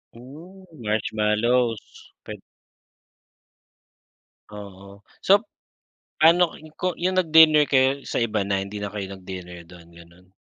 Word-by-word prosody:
Ooh, 165 +10 -14
marshmallows. 110 0 -2
Pwed - - -9 2.1
Oo. 100 -1 -13 0.2
Sop 200 +3 +3 0.8
ano 170 +2 +4 0.2
ko 180 -1 -3
yung 185 +2 -2
nag-dinner 160 -2 +5
kayo 135 +1 +1
sa - - -3
iba 110 -2 -1
na, 100 -1 -1
hindi 100 +1 -8
na 105 - -4
kayo 100 -2 -6
nag-dinner 90 -2 -10
do'n, 85 -2 -16
gano'n? 85 +2 -18
110 Hz, 110 wpm, -23 LUFS, 100-155 Hz, 2.1 s, nag-dinner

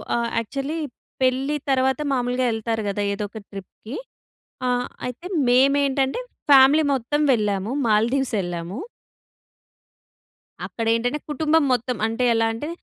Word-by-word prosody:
ఆహ్, 235 0 0
యాక్చల్లీ 275 +7 -4 0.5
పెళ్లి 265 +3 +1 0.2
తర్వాత 265 +1 +2
మామూలుగా 250 0 0
ఎళ్తారు 225 0 -2
కదా! 205 +1 -2
ఏదొక 205 +2 -5
ట్రిప్‌కి. 200 +5 -9 0.7
ఆహ్, 245 0 0 0.2
అయితే 250 +8 -7 0.2
మేమేంటంటే 275 - +3 0.3
ఫ్యామిలీ 280 +3 +7
మొత్తం 270 +4 -1
వెళ్ళాము. 205 -1 -1 0.2
మాల్దీవ్స్ 235 +4 +1
ఎళ్ళాము. 175 - -5 1.9
అక్కడ 230 - -5
ఏంటంటే 245 +6 0
కుటుంబం 310 +2 +2
మొత్తం 245 -1 -1
అంటే, 225 +3 -2
ఎలా 225 0 +2
అంటే 295 +8 -5
250 Hz, 110 wpm, -23 LUFS, 225-275 Hz, 1.9 s, ఫ్యామిలీ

